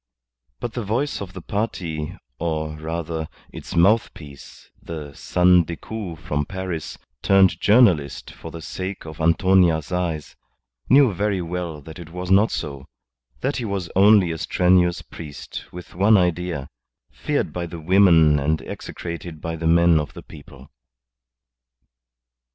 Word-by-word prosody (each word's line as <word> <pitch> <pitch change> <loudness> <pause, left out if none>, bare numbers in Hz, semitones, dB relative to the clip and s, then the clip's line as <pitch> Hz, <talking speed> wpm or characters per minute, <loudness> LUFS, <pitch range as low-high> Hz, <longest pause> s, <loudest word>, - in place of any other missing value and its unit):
But 120 - -5
the 120 - -3
voice 120 +8 -1
of 95 -2 -7
the - - -9
party, 85 -8 -3 0.2
or, 80 -2 -2
rather, 80 0 -4 0.2
its - - -8
mouthpiece, 85 -6 0
the 75 -3 -7
"son 90 +3 +3
Decoud" 85 +2 -6
from 75 -1 -2
Paris, 95 -4 -5 0.2
turned 95 -2 +4
journalist 90 - +3
for 80 - -10
the 80 0 -9
sake 95 0 -5
of 80 0 -8
Antonia's 85 -1 +3
eyes, 85 -4 -2 0.5
knew 135 -5 +6
very 100 +1 0
well 85 -3 -4
that 80 +4 -11
it 85 -1 -10
was 90 +2 -5
not 100 +4 +5
so, 70 -3 -5 0.5
that 135 +3 -1
he 120 - -3
was 100 -5 -3
only 100 -2 +6
a 80 - -5
strenuous 90 0 +2
priest 75 -4 -9
with 90 0 -10
one 100 +4 +5
idea, 90 -5 -1 0.4
feared - - -2
by 85 -1 -3
the 85 0 -8
women 80 -4 +5
and 75 +3 0
execrated 85 -1 -7
by 80 +1 -4
the 80 0 -2
men 85 -1 +5
of 75 - -5
the - - -9
people. 75 -2 -14
85 Hz, 140 wpm, -22 LUFS, 80-95 Hz, 0.5 s, knew